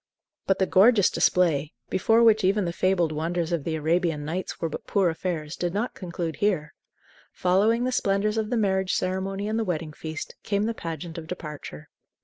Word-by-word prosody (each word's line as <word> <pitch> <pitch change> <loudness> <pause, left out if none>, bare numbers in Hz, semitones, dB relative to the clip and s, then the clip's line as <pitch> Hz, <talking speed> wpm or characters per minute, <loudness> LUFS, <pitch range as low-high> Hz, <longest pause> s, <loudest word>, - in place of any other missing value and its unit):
But 195 - +3
the 190 - +2
gorgeous 200 +2 +5
display, 155 -5 +2 0.2
before 225 +5 +3
which 220 -2 +5
even 195 +1 +2
the 170 - -2
fabled 175 -3 +1
wonders 165 +2 -2
of 170 -4 -1
the 160 +1 -2
"Arabian 160 -1 0
Nights" 175 +5 -4
were 165 - -1
but 155 - -7
poor 195 -4 +2
affairs, 160 -2 -4
did 175 +1 -2
not 225 +4 -1
conclude 170 -3 -5
here. 180 -8 0 0.6
Following 205 +6 +2
the 255 - 0
splendors 205 -2 +1
of 215 -1 -2
the 245 - 0
marriage 190 -3 +1
ceremony 190 +2 -2
and 220 +1 -1
the - - +1
wedding 160 -5 -3
feast, 160 +1 -6
came 200 0 0
the 230 +2 0
pageant 165 -3 -6
of 160 - -10
departure. 150 - -8
180 Hz, 185 wpm, -26 LUFS, 160-200 Hz, 0.6 s, gorgeous